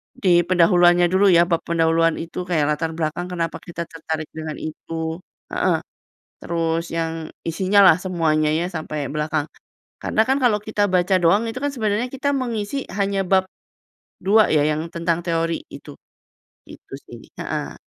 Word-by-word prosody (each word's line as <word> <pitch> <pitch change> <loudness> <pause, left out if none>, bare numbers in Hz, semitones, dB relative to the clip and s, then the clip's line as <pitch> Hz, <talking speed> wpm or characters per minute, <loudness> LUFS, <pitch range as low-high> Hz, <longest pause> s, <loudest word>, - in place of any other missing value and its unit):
di 240 -7 0 0.2
pendahuluannya 175 -1 +5
dulu 190 +2 +4
ya, 170 -1 +6
bab 170 -2 +1
pendahuluan 165 0 +2
itu, 170 +2 -5
kayak 160 -4 +2
latar 160 +2 -1
belakang 165 +2 -2
kenapa 165 -2 -2
kita 170 -1 -5
tertarik 160 -1 -4
dengan 155 -1 -5
itu, 160 +1 -5 0.3
heeh, - - +1 0.6
terus 165 0 -1
yang 165 -1 -1 0.4
isinya 190 +4 +2
lah 160 - +7
semuanya 160 -4 +1
ya 165 +3 0
sampai 155 -5 -4
belakang. 150 0 -1 0.6
Karena - - +1
kan 265 +1 +2
kalau 230 -4 +4
kita 215 -1 -1
baca 180 +1 +3
doang 200 +6 +4
itu 235 +3 -5
kan 285 - +1
sebenarnya 215 0 0
kita 275 +1 -2
mengisi 235 -3 -2 0.2
hanya 200 0 +1
bab 190 0 +3 0.8
2 215 +2 +5
ya, 150 - +4
yang 155 +1 -1
tentang 170 0 0
teori 165 -1 -1
gitu. 140 +1 -11 0.7
Itu - - -14
sih. - - -11 0.2
Heeh. - - -4
170 Hz, 155 wpm, -21 LUFS, 160-195 Hz, 0.8 s, lah